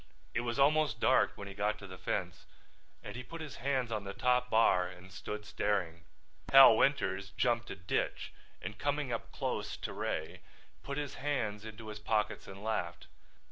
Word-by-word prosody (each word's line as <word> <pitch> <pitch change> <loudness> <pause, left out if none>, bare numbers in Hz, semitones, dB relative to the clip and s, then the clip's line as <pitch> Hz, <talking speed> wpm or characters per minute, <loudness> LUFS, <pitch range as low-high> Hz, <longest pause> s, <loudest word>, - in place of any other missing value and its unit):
It 120 - +1
was 120 +1 -2
almost 145 -4 +3
dark - - +4
when 100 - -8
he 100 - -7
got 105 +1 0
to 100 - -10
the 95 -1 -10
fence - - -3 0.6
and - - -7
he 125 - -5
put 165 +7 -9
his 155 -3 -7
hands 130 -2 0
on 110 -2 -2
the 100 0 -6
top 125 0 +2
bar 110 -6 +4
and 90 +1 -12
stood 105 +2 -6
staring. 90 -6 -1 0.5
Hal 135 -4 +10
Winters 100 -7 +1
jumped 120 -1 +1
a - - -4
ditch 90 - -2 0.3
and 105 - -6
coming 145 -2 -1
up 115 - -4
close - - -3
to - - -5
Ray - - -3 0.4
put 140 0 -5
his 145 -2 -3
hands 110 -7 -1
into 110 0 -8
his 105 0 -7
pockets 105 0 -1
and 95 +1 -10
laughed. 90 -6 -2
110 Hz, 180 wpm, -33 LUFS, 100-130 Hz, 0.6 s, Hal